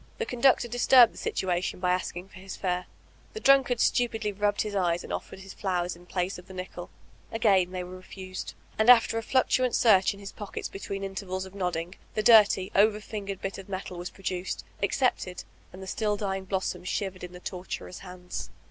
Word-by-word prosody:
The 465 - -1
conductor 250 - +3
disturbed 245 0 +6
the - - -15
situation 180 -1 -1
by 180 0 +1
asking 180 0 -2
for 190 - -13
his 190 0 -7
fare. 180 -1 -1 0.5
The 440 - -5
drunkard 270 - +4
stu 245 -1 +3
pidly 220 -2 -3
rubbed 205 0 +1
his 210 -1 -5
eyes 175 -3 +1
and - - -6
offered 190 - -6
his 190 0 -10
flowers 180 -3 -1
m 175 +1 -17
place 180 +1 -2
of 180 - -15
the 190 - -11
nickel 180 -1 -7 0.4
Again 200 -5 +3
they 185 0 -4
were 180 +1 -8
refused; 185 0 -8 0.2
and 220 +2 +4
after 230 -2 +7
a - - -4
fluctuant 255 +1 +2
search 200 -4 +5
in - - -14
his 200 0 -8
pockets 205 -2 -6
between 195 0 -5
intervals 190 -1 -4
of 190 - -12
nod 180 -3 -1
ding, 165 +3 -4 0.2
the 215 - 0
dirty, 210 -5 +6
over 210 +1 +4
fingered 200 -2 -6
bit 195 0 -3
of 195 - -11
metal 185 -2 -5
was 175 +1 -5
produced, 185 -1 -4 0.2
accepted 200 -3 0 0.2
— - - -31
and 190 +1 -9
still 210 +1 0
the 205 - -3
dying 190 -1 -2
blossoms 190 -1 -2
shivered 190 -2 -3
in 180 0 -7
the 180 - -9
torturer's 180 0 -6
hands. 180 - -7
195 Hz, 205 wpm, -28 LUFS, 180-215 Hz, 0.5 s, after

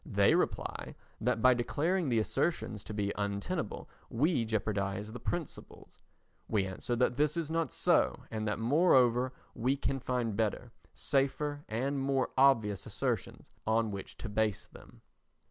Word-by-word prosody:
They - - +3
reply - - -1 0.2
that 110 - 0
by 130 - +7
declaring 155 +7 0
the 120 - +2
assertions 115 - -1
to 110 - -6
be 100 -1 -1
untenable 100 -1 -3 0.2
we 135 0 +1
jeopardise 105 -1 -2
the 125 - -7
principles. 170 +5 -6 0.5
We 105 -3 +1
answer 95 +6 -3
that 125 +1 +1
this 150 +2 +2
is 160 -2 -2
not 165 0 0
so - - +2
and 110 0 -2
that 105 - 0
moreover 125 -1 +4 0.2
we 130 +4 0
can 135 +1 -1
find 125 -4 -1
better, 110 +2 -1 0.2
safer 145 +1 0
and 135 +6 -1
more 135 -1 0
obvious 115 -7 +3
assertions - - -3 0.2
on 110 0 +2
which 100 -1 -7
to - - -6
base 105 -1 0
them. - - -16
120 Hz, 145 wpm, -32 LUFS, 110-140 Hz, 0.5 s, by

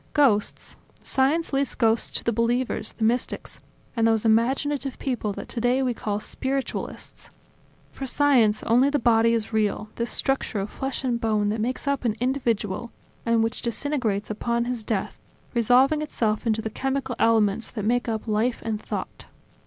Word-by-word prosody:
Ghosts... 245 -9 +2 0.3
science 285 +5 +1
leaves 275 0 0
ghosts 225 -1 +2
to - - -6
the 235 - +1
believers, 235 +3 0
the 220 - -1
mystics, 240 +3 -1 0.4
and 230 -1 +3
those 225 -1 +2
imaginative 265 +5 +1
people 240 -6 -2
that - - -7
today 245 +2 +1
we 250 -2 +1
call 210 -2 -3
spiritualists.... 265 +5 -4 0.6
For 270 - -6
science, 250 -7 +3
only 245 +5 +4
the 290 - +1
body 230 -2 +4
is 225 0 -2
real, 215 0 0
this 235 0 -1
structure 270 -5 -1
of 195 +2 -4
flesh 270 0 -4
and 240 -3 0
bone 215 -2 +1
that 215 +1 -1
makes 255 +5 -2
up 280 -2 0
an 225 -3 +1
individual 235 -4 -1 0.4
and 230 -1 +3
which 225 - -1
disintegrates 235 -5 -1
upon 235 +2 -1
his 245 -2 -3
death, 210 -2 -3 0.3
resolving 255 +6 +4
itself 225 -7 -1
into 220 0 +1
the 220 - -3
chemical 265 0 -2
elements 225 -1 +2
that 210 -3 -5
make 240 +2 +1
up 220 0 -3
life 220 +3 +1
and 220 -2 -2
thought. - - -5
235 Hz, 165 wpm, -25 LUFS, 220-265 Hz, 0.6 s, only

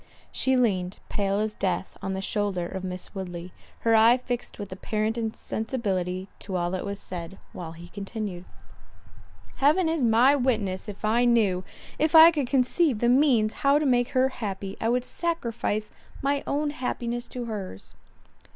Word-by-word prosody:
She 260 0 +2
leaned, 190 -6 +1
pale 200 -1 0
as 215 0 -1
death, 190 -2 -2
on 190 0 -3
the 190 - -4
shoulder 200 -4 -1
of 190 +1 -6
Miss 185 -1 -6
Woodley, 180 -2 -6 0.3
her 230 - +3
eye 225 +3 +6
fixed 245 -1 -4
with 205 -2 -7
apparent 215 +3 -2
insensibility 210 -5 -2
to 190 - -5
all 175 -1 0
that 185 +1 -3
was 200 0 -4
said, 175 +1 -7 0.2
while 165 -2 -7
he 170 +1 -11
continued, 195 -1 -5 1.1
"Heaven 310 +6 +4
is 320 -4 0
my 240 +5 +5
witness, 215 -7 -1
if 205 +1 -6
I 235 +3 +3
knew—If 230 - 0
I 325 +1 +11
could 290 -6 -1
conceive 265 +2 +2
the 240 +3 +2
means 245 -5 +4
how 280 +1 +5
to 300 - 0
make 245 -1 +3
her 260 +1 +4
happy, 200 -5 -5
I 225 - +1
would 250 +1 +1
sacrifice 235 -11 -2 0.3
my 280 +1 0
own 295 +1 0
happiness 240 -3 -3
to 245 -1 -5
hers." 200 - -6
220 Hz, 160 wpm, -26 LUFS, 190-255 Hz, 1.1 s, I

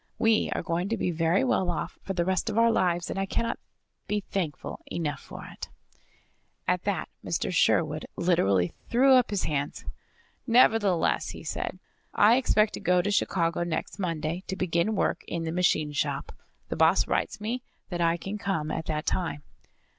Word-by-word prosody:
We 225 -1 +3
are - - -2
going 175 +3 -1
to 230 - 0
be 180 - 0
very 165 +5 +2
well 250 -8 +1
off 175 - -3
for 195 - -4
the 175 -2 0
rest 190 +4 0
of 220 - -3
our 230 0 +5
lives, 175 -4 +1
and - - -3
I 195 - -1
cannot 230 +4 -1 0.5
be 210 0 0
thankful 175 -7 -4
enough 155 -4 -2
for - - -10
it." - - -8 1.0
At 180 0 0
that 195 -6 -1 0.2
Mr. 170 - -2
Sherwood 155 -2 +2
literally 100 - +2 0.2
threw 265 +3 +5
up 250 -2 +5
his 205 -2 -1
hands. 145 -1 -2 0.6
"Nevertheless," 225 -7 +3
he - - -8
said, - - -4 0.4
"I 225 +4 +6
expect 220 -5 +2
to - - -5
go 180 0 +2
to 205 - 0
Chicago 170 -4 +1
next 175 +3 -4
Monday, 165 -1 -2
to 190 - -3
begin 180 +3 0
work - - 0
in 170 -1 -3
the 160 - -2
machine 165 -3 +1
shop. 145 - -2 0.4
The - - -2
boss - - +4
writes 215 - -1
me 230 +4 -3 0.3
that 175 -2 -3
I 170 0 +3
can 195 +4 -5
come 165 -7 -2
at 160 - -4
that 155 -1 -2
time." 165 -5 -2
180 Hz, 180 wpm, -27 LUFS, 165-210 Hz, 1.0 s, I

